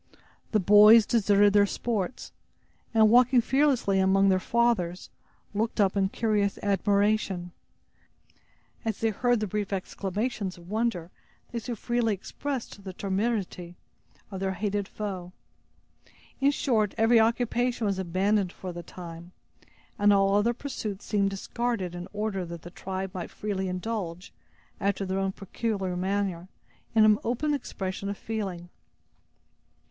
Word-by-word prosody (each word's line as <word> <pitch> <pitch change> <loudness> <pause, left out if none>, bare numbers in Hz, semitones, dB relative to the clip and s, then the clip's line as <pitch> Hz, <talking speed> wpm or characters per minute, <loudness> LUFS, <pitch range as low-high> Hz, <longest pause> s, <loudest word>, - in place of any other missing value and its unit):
The 215 - +3
boys 210 +3 +8
deserted 205 -2 +4
their 205 -1 +5
sports, 225 +1 -3 0.6
and 220 -2 +5
walking 250 +1 +6
fearlessly 260 -6 +2
among 195 +1 +4
their 185 -1 +3
fathers, 205 -6 0 0.4
looked 220 +2 -1
up 195 -1 +3
in 195 -1 +2
curious 210 -2 0
admiration, 200 -2 +1 1.3
as 225 -3 -2
they 225 0 +1
heard 245 +3 +1
the 215 - -1
brief 205 0 -3
exclamations 200 +1 -3
of 175 +2 -13
wonder 215 -6 -1 0.4
they 235 - -2
so 235 +1 -5
freely 235 -1 0
expressed 245 +1 -6
the 190 -1 -7
temerity 195 -3 -2 0.6
of 190 - -5
their 190 0 -1
hated 205 +1 -2
foe. 185 -4 -6 1.1
In 275 +1 +4
short, 225 -8 +1
every 225 +1 +5
occupation 235 +1 +1
was 195 -2 0
abandoned 190 +2 +1
for 185 -1 -7
the 175 - -6
time, 170 0 -10 0.7
and 205 0 +5
all 195 -1 +4
other 215 +4 +2
pursuits 220 -7 -5
seemed 200 -2 +1
discarded 195 -1 -3
in 175 +1 -6
order 210 -2 -2
that 170 -1 -8
the 175 - -9
tribe 190 +1 -5
might 180 -3 -5
freely 195 -2 -3
indulge, 180 -2 -4 0.5
after 200 0 0
their 190 +1 -1
own 195 0 0
peculiar 195 -2 -3
manner, 185 -1 -2 0.5
in 220 -1 +7
an 215 -1 +5
open 270 +6 0
expression 195 -7 -4
of 200 - -4
feeling. 190 -6 -5
200 Hz, 135 wpm, -27 LUFS, 190-225 Hz, 1.3 s, boys